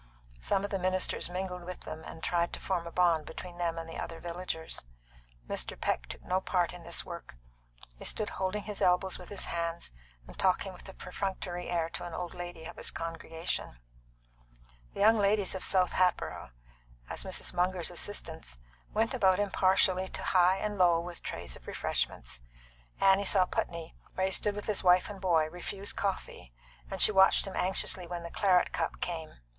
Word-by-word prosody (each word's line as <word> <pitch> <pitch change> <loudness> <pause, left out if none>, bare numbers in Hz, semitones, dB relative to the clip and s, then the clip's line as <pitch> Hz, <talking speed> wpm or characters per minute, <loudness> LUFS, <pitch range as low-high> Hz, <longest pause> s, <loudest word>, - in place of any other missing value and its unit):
Some 190 - +1
of 205 - -3
the 195 - 0
ministers 185 0 +1
mingled 180 0 -3
with 180 +1 -7
them, 155 0 -7
and 160 - -9
tried 170 -1 +1
to - - -4
form 175 -3 -1
a - - -6
bond 170 -3 +4
between 175 -1 -8
them 170 -1 0
and 165 0 -4
the 165 - -6
other 165 -1 -5
villagers. 170 - -3 0.6
Mr. - - -2
Peck - - 0
took - - -8
no 185 +1 +1
part 180 -2 +1
in 180 - -9
this 170 0 -3
work; 170 - -8 0.6
he - - -8
stood 215 - -1
holding 190 +2 -1
his 210 -1 -5
elbows 180 +1 +3
with 180 - -10
his 205 - -4
hands, 170 - -3 0.3
and - - -13
talking 190 +1 +2
with 180 - -11
a 195 - -10
perfunctory 180 -1 -4
air 170 -2 +1
to - - -5
an 175 -2 -5
old 175 -1 -4
lady 175 -2 -7
of - - -8
his - - 0
congregation. 165 - -4 1.2
The - - -2
young 220 +2 +6
ladies 200 -1 +3
of 190 - -3
South 185 -2 +3
Hatboro', 180 - +1 0.6
as - - -4
Mrs. - - -3
Munger's 180 -1 +1
assistants, 165 - -4 0.4
went 225 +4 +2
about 190 -7 +4
impartially 190 -2 +3
to - - -5
high 185 +1 +5
and 210 0 -2
low 175 -2 +6
with 175 0 -6
trays - - -4
of - - -15
refreshments. 60 0 -2 0.6
Annie 195 +1 +5
saw 190 -1 +5
Putney, 170 -2 -3 0.2
where 190 - +2
he 190 - 0
stood 205 +1 +2
with 205 - -5
his 210 -3 0
wife 180 +2 +5
and 195 -2 -9
boy, 165 -4 +3
refuse 195 +3 -4
coffee, 195 - -3 0.4
and - - -4
she - - +8
watched 190 -1 +6
him 195 - -5
anxiously 185 -1 0
when 175 0 -4
the 170 - -6
claret 185 -3 +4
cup 165 - -2
came. 165 -3 -4
180 Hz, 185 wpm, -31 LUFS, 170-190 Hz, 1.2 s, she